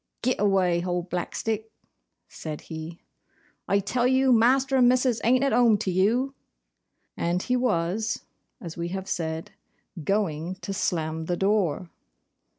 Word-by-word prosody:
'Git 255 +1 +1
away, 190 -4 +3
hold 175 0 -3
Blackstick!' 220 +5 -2 0.6
said 155 -2 -7
he. 160 +1 -8 0.7
'I 200 0 +2
tell 240 +5 +1
you, 260 0 +3
Master 265 +4 +3
and 245 -1 +6
Missis 250 -2 +2
ain't 255 +3 +3
at 275 - +2
home 235 -2 +5
to 195 - -2
you;' 230 +9 +2 0.8
and 175 +2 -1
he 250 - 0
was, 220 -3 0 0.4
as 165 -2 -8
we 170 0 -3
have 190 +2 -5
said, 160 -2 -3 0.5
GOING 185 -3 -1
to 195 - -4
slam 160 -3 -1
the 175 +1 -1
door. 190 -4 0
195 Hz, 140 wpm, -26 LUFS, 170-240 Hz, 0.8 s, and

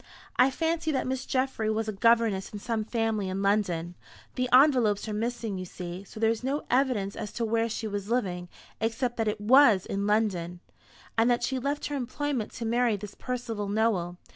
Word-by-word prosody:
I 255 +2 +5
fancy 320 +3 -1
that 265 - 0
Miss 260 0 -3
Geoffry 255 -4 0
was 220 0 -1
a - - -1
governess 225 -2 +2
in 210 - -6
some 220 +1 -2
family 225 -3 -1
in 190 +1 -2
London 180 -4 +1 0.4
the 250 0 -1
envelopes 250 -6 +5
are 215 - -3
missing, 225 -2 -2
you 185 - -5
see, 180 +1 -7
so 215 - -11
there 225 0 +3
is 230 +1 -4
no 275 +3 -1
evidence 245 -7 +1
as 210 -2 -5
to 235 - -1
where 225 +1 +1
she 220 - -4
was 205 0 -4
living, 180 -7 -1 0.3
except 235 +2 -1
that 225 -1 0
it 210 0 -1
was 225 -3 +6
in 200 +1 -2
London 185 -5 0 0.6
and 230 +2 +4
that 240 -1 +2
she 265 -1 0
left 280 +3 -2
her 290 - -3
employment 260 -2 -2
to 230 - -5
marry 235 -1 +2
this 200 0 -8
Percival 235 -5 -4
Nowell. 200 -5 0
225 Hz, 195 wpm, -28 LUFS, 205-250 Hz, 0.6 s, was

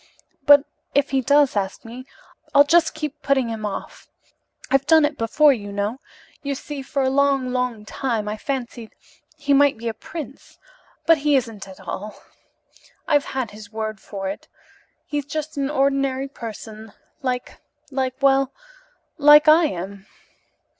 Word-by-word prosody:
But 285 0 +8 0.3
if 285 - +2
he 270 -1 +2
does 285 0 +3
ask 195 +1 -3
me 250 +3 -9 0.5
I'll 285 - +9
just 330 +3 +3
keep 300 -1 -5
putting 270 -5 +1
him 220 -2 -3
off. 200 - -8 0.6
I've 275 +1 +2
done 320 -2 +6
it 295 0 -2
before, 285 +5 +4
you 205 -5 -6
know. 205 +5 -2 0.4
You 280 -1 -3
see, 285 +1 -7
for 275 +1 -2
a 260 - +2
long, 275 -2 +2
long 250 -4 -2
time, 225 -2 -2
I 210 - -2
fancied 240 -2 -5 0.4
he 290 -2 +1
might 285 -2 +4
be 230 +1 -6
a 225 - -1
prince, 295 +2 -9 0.5
but 330 -2 +5
he 290 0 +2
isn't 225 -7 -2
at 190 0 -12
all. 195 +3 -6 0.9
I've 290 -2 +3
had 260 -5 -3
his 210 0 -12
word 215 -1 -4
for 195 -1 -6
it. 195 - -6 0.6
He's 290 -2 -3
just 310 +1 -5
an 280 -1 -1
ordinary 275 -1 +1
person 220 -4 -9 0.3
like 250 -2 -4 0.3
like 260 -1 -1
well, 270 -1 +4 0.7
like 295 +1 +7
I 315 +2 +7
am. 195 - -5
265 Hz, 155 wpm, -22 LUFS, 220-285 Hz, 0.9 s, I'll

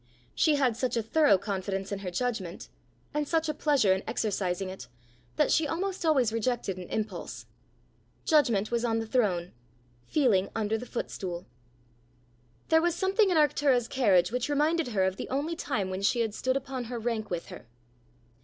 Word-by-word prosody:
She 310 -2 +3
had 260 -5 +2
such 250 0 -1
a 230 - 0
thorough 285 -1 +4
confidence 195 0 -3
in 200 - -2
her 195 -2 -4
judgment, 195 -3 -3 0.4
and 295 0 -1
such 325 0 +1
a 305 - 0
pleasure 285 -10 +3
in 190 - -2
exercising 190 -3 -1
it, 185 -10 -8 0.5
that - - +2
she 315 - +3
almost 370 +5 -3
always 265 -9 +3
rejected 230 -4 -1
an 180 - -8
impulse. 215 -1 -4 0.8
Judgment 235 -10 +3
was 235 0 0
on 225 -2 +1
the 225 - -2
throne; 195 -7 0 0.6
feeling 225 -11 +2
under 220 -1 0
the 240 +3 -5
footstool. 180 -6 -5 1.2
There 320 0 +5
was 345 0 +1
something 385 +3 +2
in 355 - +2
Arctura's 280 -5 +3
carriage 200 -8 +3
which 250 +3 -1
reminded 305 +2 +1
her 210 -6 +1
of 190 0 0
the - - -6
only 290 +5 -1
time 210 - -2
when 185 +1 -3
she 235 +4 +2
had 220 -2 -1
stood 260 +4 0
upon 265 -2 -5
her 240 +1 -5
rank 225 -2 -2
with 175 -2 -4
her. - - -11
235 Hz, 175 wpm, -28 LUFS, 195-290 Hz, 1.2 s, There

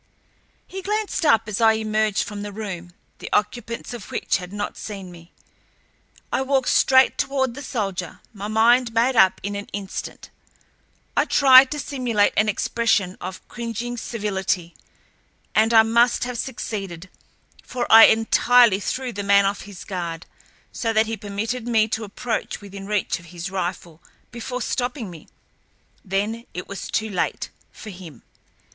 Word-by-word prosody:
He 385 +1 -7
glanced 410 -4 -1
up 225 -5 +4
as 210 +1 -3
I 225 -1 +6
emerged 215 -1 0
from 205 -1 -7
the 205 0 -6
room, 190 -5 -6 0.3
the - - -7
occupants 230 +3 -2
of 235 -5 -9
which - - 0
had 180 -1 -9
not 205 0 -4
seen 195 -4 -8
me. 170 0 -15 1.0
I - - +1
walked 265 -1 +1
straight 260 0 +4
toward 265 -3 0
the 290 - -8
soldier, 195 -9 -4
my 205 -1 -6
mind 230 +2 +3
made 245 +3 +3
up 190 -4 +5
in 205 +1 -3
an 200 0 -5
instant. 195 -1 -6 0.8
I - - +3
tried 265 -1 +7
to 295 - -4
simulate 245 -7 0
an 215 0 +3
expression 210 -3 0
of 185 0 -8
cringing 235 +1 -5
servility, 195 -7 -2 0.8
and 220 +1 +3
I 225 -1 +7
must 235 +2 +3
have 245 -1 -4
succeeded, 195 -8 -5 0.5
for 245 -1 -4
I 225 0 +11
entirely 225 -1 +4
threw 255 +4 -3
the 205 - -4
man 200 0 +4
off 200 0 -2
his 195 - -10
guard, 170 -3 -5 0.5
so 225 -1 -2
that 220 0 +3
he 225 +1 -3
permitted 220 +3 -4
me 220 -2 +3
to 220 +1 -2
approach 220 +3 -4
within 200 -1 -10
reach 210 -4 -1
of 170 - -16
his 175 +2 -7
rifle 175 -3 -4 0.3
before 245 +1 -5
stopping 245 -5 -3
me. 165 -3 -13 0.8
Then 210 +4 -2
it 180 - -5
was 200 - -7
too 220 -1 -1
late—for 210 +3 -5
him. 175 -8 -12
215 Hz, 155 wpm, -22 LUFS, 195-240 Hz, 1.0 s, I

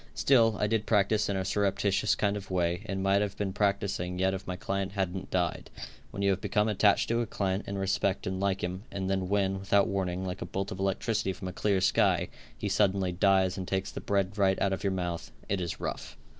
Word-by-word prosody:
Still, 115 -5 +4
I - - +2
did 110 0 0
practice 105 0 +2
in 100 - 0
a 95 - -2
surreptitious 100 0 +1
kind 100 -1 0
of 100 -2 -7
a - - -5
way, 90 0 +1
and 95 -1 -2
might 100 +1 +3
have 100 -1 -2
been 100 -2 -2
practicing 100 -3 0
yet 95 +1 +2
if 95 0 -6
my 90 - -3
client 100 +1 -3
hadn't 95 -2 -2
died. 90 -3 -1 0.4
When 100 - -4
you 100 - +4
have 95 - -1
become 105 +1 +1
attached 105 -1 +3
to 115 +1 +2
a 115 - -2
client 95 -1 -2
and 100 - -3
respect 95 0 0
and 95 0 -2
like 95 -1 0
him, 90 +1 -3
and 95 -1 -2
then 95 -1 -1
when, 95 -1 +1
without 100 +1 +3
warning, 95 -1 -2
like 90 +1 -5
a - - -2
bolt 95 0 -3
of 95 - -6
electricity 95 +1 0
from 95 0 -6
a - - -8
clear 100 -1 +1
sky, - - +3 0.3
he 105 - -3
suddenly 95 -2 +2
dies 95 +1 +2
and 95 - -5
takes 95 0 -1
the - - -6
bread 100 +1 -1
right 95 -1 +3
out 100 -1 +1
of 95 - -4
your 100 - +2
mouth, 90 -3 -3 0.2
it 100 -1 -1
is 85 -4 -4
rough. - - -5
95 Hz, 235 wpm, -29 LUFS, 95-100 Hz, 0.4 s, Still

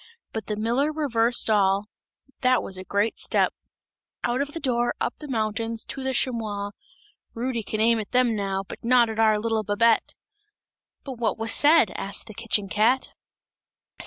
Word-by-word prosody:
But 220 -2 -5
the 210 - -2
miller 240 +8 0
reversed 240 -6 +1
all, 200 -2 +2 0.5
that 255 0 +2
was 190 - -5
a 185 - -6
great 205 +3 -1
step! - - +1 0.7
Out 245 +3 0
of 285 +1 -4
the 330 - -4
door, 240 -4 0
up - - -2
the 300 - -8
mountains, 225 -2 -2
to 270 - -6
the 265 0 -1
chamois! 215 -6 -1 0.6
Rudy 235 0 -2
can 215 0 -4
aim 230 +1 +3
at 210 - -6
them 250 -2 +3
now, 195 -1 -2
but - - -10
not 240 -1 +4
at 220 - -6
our 220 -1 +4
little 220 +1 -1
Babette!" 220 +3 +2 0.9
"But 260 -4 -8
what 225 -3 0
was 225 0 -1
said?" 295 - +5
asked 195 +1 0
the 220 - -10
kitchen 215 -2 -1
cat. 220 +6 +1
225 Hz, 170 wpm, -25 LUFS, 215-250 Hz, 0.9 s, said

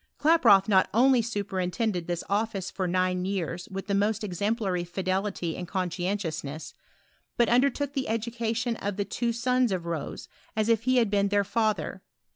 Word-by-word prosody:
Klaproth 235 -12 +5
not 190 -3 +4
only 255 +1 +5
superintended 200 -3 -2
this 175 -1 -2
office 200 -2 -1
for 190 -2 -2
nine 185 0 +1
years 180 -2 -3
with 195 0 -5
the 200 - -2
most 210 +2 +1
exemplary 200 -1 -1
fidelity 185 -1 -2
and 180 - -6
conscientiousness, 175 -5 -3 0.6
but 235 - +4
undertook 280 +3 +2
the 270 -4 -2
education 230 +1 -1
of 205 -1 -4
the 200 - -1
two 235 +4 -1
sons 250 0 +1
of 180 -3 -2
Rose, 165 -4 -4 0.3
as 215 +1 +1
if 230 0 +2
he 255 0 +3
had 230 -4 +3
been 200 -1 +2
their 205 0 +2
father. 205 -3 -1
200 Hz, 160 wpm, -27 LUFS, 185-230 Hz, 0.6 s, Klaproth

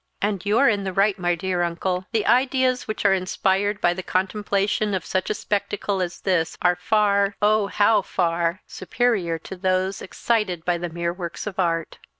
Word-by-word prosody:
"And 200 -2 -1
you 210 +2 +3
are 275 - +5
in 205 -3 +2
the 190 -1 -3
right, 195 +1 +2
my 175 -1 +1
dear 180 0 -2
uncle. 180 +2 -2
The 225 -3 0
ideas 255 0 +2
which 215 -1 -4
are 195 - +6
inspired 195 +2 0
by 175 - +2
the 185 - -5
contemplation 200 +2 0
of 185 - -4
such 185 0 -1
a 215 - 0
spectacle 200 -1 -2
as 175 -1 -4
this 180 -4 0
are 180 0 +3
far 200 +1 +2
oh, 210 0 +3
how 205 +1 +3
far! 170 -1 -1
superior 200 -9 -1
to 165 - -9
those 185 +1 -1
excited 190 -5 -1
by 175 -1 +1
the 175 0 -4
mere 170 +1 -2
works 175 -2 -6
of 195 -2 -6
art. 165 -3 -1
190 Hz, 185 wpm, -23 LUFS, 180-210 Hz, -, are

